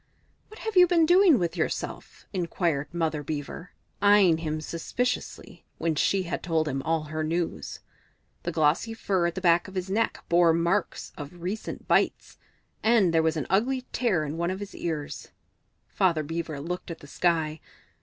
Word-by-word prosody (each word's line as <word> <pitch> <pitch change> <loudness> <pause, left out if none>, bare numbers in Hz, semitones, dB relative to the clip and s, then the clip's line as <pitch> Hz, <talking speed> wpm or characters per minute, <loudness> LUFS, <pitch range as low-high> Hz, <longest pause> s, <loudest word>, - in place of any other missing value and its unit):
"What 435 - -13
have 440 -2 -4
you 360 -1 +8
been 335 -2 +4
doing 355 -3 +6
with 175 -4 -1
yourself?" - - -4
inquired 170 -5 -1
Mother 160 -3 -1
Beaver, 145 +4 -6 0.3
eyeing 200 -5 +5
him 155 -1 -2
suspiciously, 205 +11 -3
when 165 0 0
she 190 +5 +1
had 170 - -4
told 160 -2 0
him 135 -1 -2
all 160 +1 0
her 155 +1 -4
news. 160 - -3 0.6
The 175 - -3
glossy 160 +8 +1
fur 190 -5 0
at 170 - -4
the 190 - -4
back 170 0 +3
of 190 - -11
his 185 0 -3
neck 225 +3 0
bore 170 -1 +5
marks 170 +5 -1
of 165 +4 -9
recent 200 +5 -5
bites, - - +1 0.4
and 220 -6 +4
there 165 - +4
was 160 0 +1
an 150 - -2
ugly 255 +7 +1
tear 190 -11 +1
in 150 +2 -5
one 170 +1 0
of 190 +1 -3
his 205 -1 -7
ears. 155 -4 -4 0.6
Father 170 -5 +1
Beaver 160 -1 -4
looked 180 +6 -5
at 165 - -7
the - - -12
sky. 160 0 0
170 Hz, 175 wpm, -27 LUFS, 160-195 Hz, 0.6 s, you